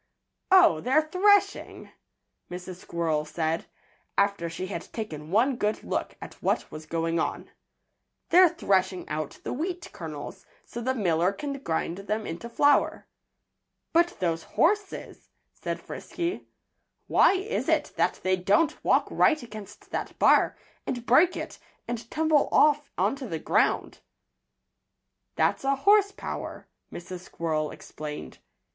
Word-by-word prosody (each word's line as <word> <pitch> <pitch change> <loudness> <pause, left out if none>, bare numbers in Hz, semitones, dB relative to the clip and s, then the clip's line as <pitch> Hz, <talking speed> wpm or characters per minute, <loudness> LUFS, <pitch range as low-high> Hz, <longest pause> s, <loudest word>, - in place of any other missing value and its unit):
"Oh! 365 - +6
they're 270 - +3
threshing!" 400 +3 +2 0.6
Mrs. 180 0 -7
Squirrel 165 -4 -1
said, 160 +1 -2 0.5
after 200 -4 +1
she 165 +3 -5
had 185 -3 -6
taken 155 -9 -6
one 240 +7 +2
good 210 -1 -1
look - - -3
at - - -11
what - - 0
was 155 0 -9
going 165 +1 -1
on. - - -3 0.8
"They're 360 +1 +7
threshing 190 - 0
out 150 -1 -4
the - - -3
wheat 345 +5 -4
kernels, 160 +4 -8 0.2
so 235 - -7
the 260 +2 0
miller 180 -4 +2
can 280 +8 -5
grind 170 -4 -2
them 210 +2 -3
into 175 +8 -6
flour." 285 +4 +2 0.9
"But 345 +1 +3
those 165 -3 0
horses 400 - -1
" - - -50
said - - -3
Frisky. 350 +1 -5 0.6
"Why - - +5
is 395 +5 -2
it - - +1
that - - 0
they 185 0 +3
don't 200 - +1
walk - - +3
right 310 -4 +3
against 215 -3 -11
that - - -4
bar, - - +4 0.3
and 245 -2 -3
break 320 +10 +5
it, - - -6 0.3
and 235 -1 -5
tumble 315 -2 +2
off 295 -1 +4
onto 270 -3 -1
the 165 - -2
ground?" 155 - +1 1.4
"That's - - +1
a 275 0 +2
horse 405 +7 +4
power," - - -7 0.2
Mrs. 180 +1 -7
Squirrel 160 -3 -2
explained. 150 -1 -8
210 Hz, 135 wpm, -27 LUFS, -, 1.4 s, They're